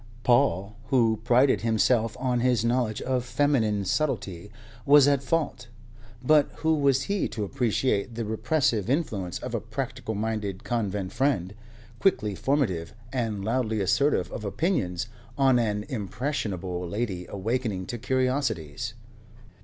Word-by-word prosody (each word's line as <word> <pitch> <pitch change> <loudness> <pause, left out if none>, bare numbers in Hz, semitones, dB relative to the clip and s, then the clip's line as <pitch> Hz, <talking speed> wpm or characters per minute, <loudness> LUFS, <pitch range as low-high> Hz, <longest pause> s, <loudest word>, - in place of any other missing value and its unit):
Paul, 110 -4 +2
who 115 -5 +3
prided 125 +3 +4
himself 115 0 +2
on 125 -1 0
his 120 -2 +2
knowledge 120 -2 0
of 130 -1 0
feminine 120 -6 +1
subtlety, 100 - -2 0.3
was 145 +1 +7
at 140 -2 +3
fault; 140 -4 -1 0.6
but 150 +2 +4
who 160 0 +4
was 140 -3 +2
he 200 +4 0
to 105 - -4
appreciate 115 0 0
the 115 -1 -3
repressive 110 -1 0
influence 110 - -1
of - - -6
a - - -1
practical 110 - -4
minded 105 -2 -3
convent 100 -5 -2
friend, 125 -10 0 0.5
quickly 105 - +2
formative 105 - -1 0.2
and 110 -6 -2
loudly 110 -1 0
assertive 140 +9 +2
of 110 - -6
opinions, 100 - -1 0.3
on 135 -3 +4
an 105 -3 0
impressionable 95 - -3
lady 100 -4 -3
awakening 105 -1 -2
to 120 - -5
curiosities? 125 - -1
115 Hz, 130 wpm, -26 LUFS, 100-130 Hz, 0.6 s, was